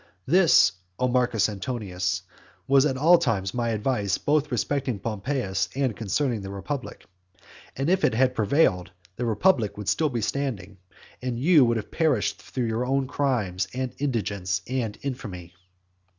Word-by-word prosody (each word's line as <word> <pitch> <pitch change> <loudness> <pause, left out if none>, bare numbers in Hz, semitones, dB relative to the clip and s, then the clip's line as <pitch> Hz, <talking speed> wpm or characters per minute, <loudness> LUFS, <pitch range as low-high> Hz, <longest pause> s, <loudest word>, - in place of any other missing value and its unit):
This, 165 - +5 0.3
O 125 - +1
Marcus 125 -4 +2
Antonius, 95 -4 -3 0.4
was 135 +1 +5
at 135 -2 -2
all 165 +5 +6
times 105 - -1
my 120 -1 -1
advice 105 -2 0
both 150 0 0
respecting 125 0 -1
Pompeius 105 -1 -2
and 130 -5 0
concerning 115 +2 -1
the 95 - -7
republic. 125 +8 -6 0.7
And 135 +2 -2
if 185 +2 +2
it - - +3
had 130 +2 +3
prevailed, 105 - +2 0.3
the 120 - -2
republic 115 - +2
would 105 -2 -7
still 155 -2 +2
be 120 -4 -2
standing, 105 -6 -3 0.4
and 125 -2 -3
you 155 +1 +6
would 115 -1 +1
have 110 - -6
perished 150 -10 0
through 125 -2 -3
your 115 +2 -1
own 135 +1 0
crimes, 115 -10 -1
and 130 -1 -3
indigence, 100 -9 -2
and 120 -5 -2
infamy. 95 -10 -6
120 Hz, 150 wpm, -25 LUFS, 100-135 Hz, 0.7 s, all